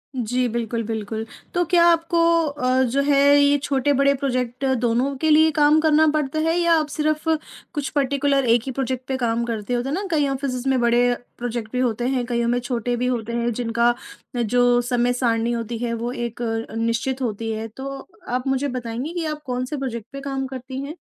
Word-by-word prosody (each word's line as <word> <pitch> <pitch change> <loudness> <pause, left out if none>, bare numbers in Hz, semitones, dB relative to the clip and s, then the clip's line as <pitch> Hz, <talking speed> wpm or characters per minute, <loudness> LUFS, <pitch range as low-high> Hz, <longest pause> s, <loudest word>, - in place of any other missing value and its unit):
जी, 250 +1 0
बिल्कुल-बिल्कुल। 225 -1 -3 0.3
तो 350 - +2
क्या 340 -1 +6
आपको 335 0 +3 0.3
अ, 260 -3 +1
जो 260 +2 +1
है 285 0 +3 0.2
ये 285 0 +4
छोटे-बड़े 280 0 +2
प्रोजेक्ट 255 -2 -2
दोनों 245 +4 +1
के 315 +4 0
लिए 315 +1 +6
काम 300 +1 +4
करना 315 0 +4
पड़ता 305 0 -1
है? 325 +1 +1
या 340 -1 +3
आप 305 - -2
सिर्फ़ 305 +1 -1 0.4
कुछ 290 -3 -2
पर्टिक्युलर 280 -1 +1
1 235 0 +5
ही 265 - -3
प्रोजेक्ट 260 -1 -3
पर 265 - 0
काम 235 -2 0
करते 225 -1 -3
होते 245 +3 -1
ना, 370 +7 -1
कई 295 -3 +2
ऑफिसिस 270 -2 -3
में 265 -1 +2
बड़े 240 +1 +3 0.2
प्रोजेक्ट 235 -2 -4
भी 250 - -2
होते 245 -1 0
हैं, 255 -2 0
कईयों 235 -1 -1
में 245 +1 +1
छोटे 245 -1 -2
भी 250 - -1
होते 235 -2 -2
हैं, 235 0 0
जिनका 235 +1 +1 0.5
जो 245 +2 +3
समय 245 0 +1
सारणी 235 -2 0
होती 235 0 -3
है, 235 0 -2
वो 230 +1 -3
एक 240 -1 -5
अ, 225 -1 -3
निश्चित 230 +4 -1
होती 225 -2 -2
है। 220 +1 -4
तो 270 +5 -7 0.3
आप 250 +2 -2
मुझे 270 +1 +1
बताएँगी 245 +6 -4
कि 345 -2 -2
आप 305 -1 -4
कौन 250 -1 -2
से 295 +3 -5
प्रोजेक्ट 235 -5 -4
पे 275 - -6
काम 270 -1 -3
करती 260 0 -6
हैं? 285 +3 -6
255 Hz, 200 wpm, -22 LUFS, 235-280 Hz, 0.5 s, क्या